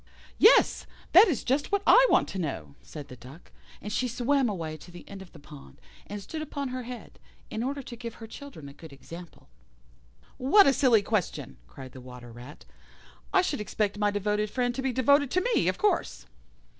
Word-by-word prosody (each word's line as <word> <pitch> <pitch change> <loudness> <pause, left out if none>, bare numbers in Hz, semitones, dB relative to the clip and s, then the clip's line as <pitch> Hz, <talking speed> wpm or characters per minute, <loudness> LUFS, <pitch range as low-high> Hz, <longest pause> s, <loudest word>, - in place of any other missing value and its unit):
"Yes, 440 - +5 0.2
that 385 +6 +8
is 295 -10 -1
just 275 +3 -1
what 405 0 +1
I - - +7
want - - +3
to 190 - -5
know," 85 - -4
said 135 - -10
the 125 - -11
Duck; 130 +7 -15 0.3
and 210 - -7
she 255 - 0
swam 250 +2 +1
away 165 -6 -4
to 175 - -15
the 175 0 -13
end 195 -1 -9
of 190 - -13
the - - -15
pond, 145 - -14 0.3
and 205 - -6
stood 310 +11 -7
upon 285 -3 -4
her 255 0 -4
head, 245 0 -10 0.3
in 220 - -3
order 275 +3 -3
to 240 - -9
give 235 -1 -8
her 225 - -10
children 225 - -11
a 140 - -11
good 160 +2 -13
example. 165 +5 -12 0.9
"What 390 +11 +5
a 275 - +4
silly 240 -6 +4
question!" 195 - -3
cried 130 - -11
the 130 - -12
Water 125 -1 -11
rat. 120 +5 -12 0.7
"I 375 - +4
should 290 -10 -2
expect 210 -1 -2
my 210 -1 +2
devoted 210 +1 -1
friend 245 +1 -1
to 265 - -4
be 265 0 -1
devoted 280 +3 +3
to 365 - +1
me, - - +2
of - - 0
course." 420 - -1
215 Hz, 205 wpm, -27 LUFS, -, 0.9 s, that